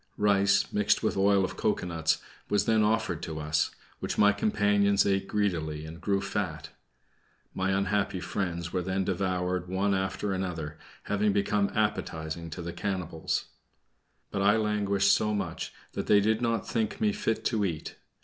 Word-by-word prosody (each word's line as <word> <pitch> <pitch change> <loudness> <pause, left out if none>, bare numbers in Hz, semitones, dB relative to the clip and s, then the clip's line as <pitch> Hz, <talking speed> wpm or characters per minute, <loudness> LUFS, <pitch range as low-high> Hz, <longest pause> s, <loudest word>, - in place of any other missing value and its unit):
Rice, 100 -1 +3
mixed 105 +2 +2
with 110 - +1
oil 100 0 +4
of 90 -1 -6
cocoanuts, 80 -6 0 0.3
was 105 - +2
then 110 -1 +3
offered 105 -6 +1
to 80 -1 -5
us, 75 0 +1 0.3
which - - -3
my 105 0 +6
companions 105 -1 +3
ate 95 -1 +1
greedily 80 -7 -1
and 80 +2 -9
grew 100 -1 +1
fat. 80 -6 -3 0.8
My 95 0 -1
unhappy 95 0 0
friends 90 -2 -3
were 90 - +1
then 95 +2 -1
devoured 90 -1 -1
one 95 +2 +1
after 95 +1 -1
another, 80 -5 -4 0.2
having 105 0 +1
become 100 0 +1
appetizing 85 -6 -2
to 85 +2 -6
the 85 0 -5
cannibals. 90 -5 -2 0.8
But 100 - -1
I 105 +2 +5
languished 100 -2 +2
so 105 0 +1
much 95 -5 -3 0.2
that - - -4
they 105 - +6
did 110 +3 +1
not 115 -1 0
think 110 -2 -1
me 215 -2 +3
fit 115 - -1
to 110 -4 +1
eat. 85 -6 -3
100 Hz, 160 wpm, -29 LUFS, 90-105 Hz, 0.8 s, my